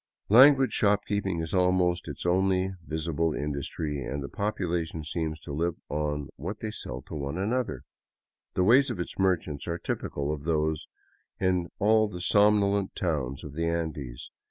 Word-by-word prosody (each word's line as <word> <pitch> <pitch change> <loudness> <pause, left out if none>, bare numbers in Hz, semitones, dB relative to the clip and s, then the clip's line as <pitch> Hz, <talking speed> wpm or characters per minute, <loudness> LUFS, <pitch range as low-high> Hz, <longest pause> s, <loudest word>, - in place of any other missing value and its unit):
Languid 135 +4 +7
shopkeeping 100 -4 +1
is 80 -1 -4
almost 90 -1 +2
its - - -6
only 95 +1 +2 0.2
visible 80 0 -1
industry, 75 0 -3
and 70 +2 -4
the 70 - -6
population 85 -6 -2
seems 80 0 -3
to 75 - -7
live 85 +3 0
on 75 -1 -2
what 95 +9 -5
they 110 - -4
sell 65 -10 -6
one 70 0 -4
another. 120 +6 -1 0.7
The 90 - +3
ways 130 +8 +5
of 115 -7 -4
its 90 - -5
merchants 85 -6 0
are 85 0 -1
typical 70 -3 -3
of 75 -2 -6
those 80 -1 0 0.5
in 90 -2 +1
all 110 +1 +4
the 90 -4 -7
somnolent 100 +1 +3
towns 70 -7 -2
of 75 - -8
the 85 +2 -1
Andes. 80 -7 -4
85 Hz, 155 wpm, -28 LUFS, 75-100 Hz, 0.7 s, Languid